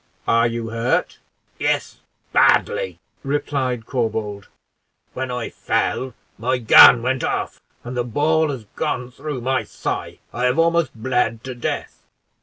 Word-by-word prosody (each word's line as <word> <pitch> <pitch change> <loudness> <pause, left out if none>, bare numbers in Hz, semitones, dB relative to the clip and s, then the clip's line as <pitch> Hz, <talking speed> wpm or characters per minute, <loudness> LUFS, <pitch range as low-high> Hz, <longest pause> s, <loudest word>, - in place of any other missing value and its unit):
"Are 115 +1 +4
you 115 -1 -4
hurt?" 115 +2 -1 0.4
"Yes, - - -1 0.3
badly," 480 0 +3 0.3
replied 135 -4 -2
Corbould; 110 -5 -3 0.7
"when 130 0 -4
I 125 -2 -4
fell, 130 -2 -1 0.2
my 125 +3 0
gun 115 0 +8
went 130 0 0
off, - - -2 0.2
and 125 +1 -6
the 120 - 0
ball 155 +6 +1
has 130 -5 -5
gone 125 -5 -2
through 140 0 -6
my 130 +1 0
thigh. - - -5 0.2
I 125 - -1
have 125 +4 +2
almost 165 -2 +2
bled 115 -1 -1
to 130 - -5
death." 120 - -4
125 Hz, 135 wpm, -21 LUFS, 115-140 Hz, 0.7 s, gun